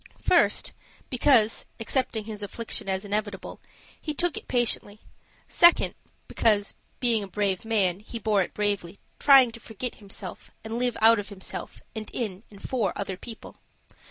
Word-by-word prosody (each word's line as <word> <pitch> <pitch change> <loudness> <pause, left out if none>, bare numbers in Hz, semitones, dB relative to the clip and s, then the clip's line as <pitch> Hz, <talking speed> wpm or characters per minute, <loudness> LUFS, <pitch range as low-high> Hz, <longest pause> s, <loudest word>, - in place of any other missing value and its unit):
First, - - +3 0.4
because, 245 -4 +3
accepting 225 -1 0
his 215 -1 -7
affliction 205 0 -2
as 190 +1 -1
inevitable, 205 -1 -4 0.4
he 305 -2 -4
took 350 0 +1
it - - -7
patiently; 230 -4 0 0.4
second, 345 0 +5 0.3
because, 205 -3 +2 0.2
being 235 -3 +2
a - - -6
brave 195 0 -1
man, 195 -5 +1
he 220 +3 -8
bore 210 -2 +2
it 180 - -4
bravely, 205 -3 -1 0.2
trying 270 -4 +7
to 230 - -11
forget 230 +2 -5
himself, 195 -3 -8
and 225 +2 -4
live 245 -1 0
out 225 0 +7
of 205 - -6
himself, 195 -2 -7
and 220 -1 -5
in 205 -5 -3
and 200 -1 -10
for 235 -6 0
other 195 -2 -3
people. 225 +4 -10
215 Hz, 155 wpm, -26 LUFS, 200-235 Hz, 0.4 s, trying